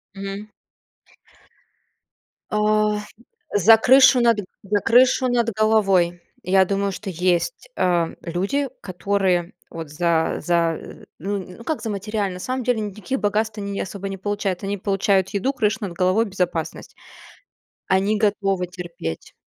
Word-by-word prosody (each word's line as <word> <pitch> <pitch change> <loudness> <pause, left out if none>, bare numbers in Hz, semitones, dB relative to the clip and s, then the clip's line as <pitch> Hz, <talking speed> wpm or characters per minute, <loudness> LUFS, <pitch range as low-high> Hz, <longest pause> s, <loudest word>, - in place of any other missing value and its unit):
Мгм. 195 +2 -6 2.0
А, 210 0 +2 0.5
за 220 +3 +7
крышу 260 +1 +6
над 230 -2 +4 0.3
за 205 +1 +1
крышу 255 +2 +4
над 235 -2 +1
головой, 195 -6 +3 0.2
я 190 +1 +4
думаю, 200 +1 -1
что 195 +1 -6
есть, 180 - -1
а, 170 -2 +1
люди, 200 +12 -1
которые 185 -2 0 0.2
вот 165 -3 -7
за 160 +1 +1
за, 170 -2 +1 0.4
ну, 200 +4 -2
нь 185 -1 -8
ну, 230 - -11
как 315 - -2
за 225 - -4
материально, 205 -1 -2
на - - -8
самом 255 +4 -3
деле 245 -2 +1
никаких 215 +5 -4
богатств 215 +1 0
они 200 -1 -4
ни 195 - -4
особо 195 +1 -5
не 195 - -5
получают, 200 -1 -2
они 200 +1 -2
получают 195 -1 +1
еду, 210 +7 0
крышу 215 -2 0
над 190 -4 -4
головой, 185 +6 +2
безопасность. 180 -5 -3 0.9
Они 195 +3 +2
готовы 195 -3 +1
терпеть. 170 - -7
200 Hz, 140 wpm, -22 LUFS, 180-215 Hz, 2.0 s, за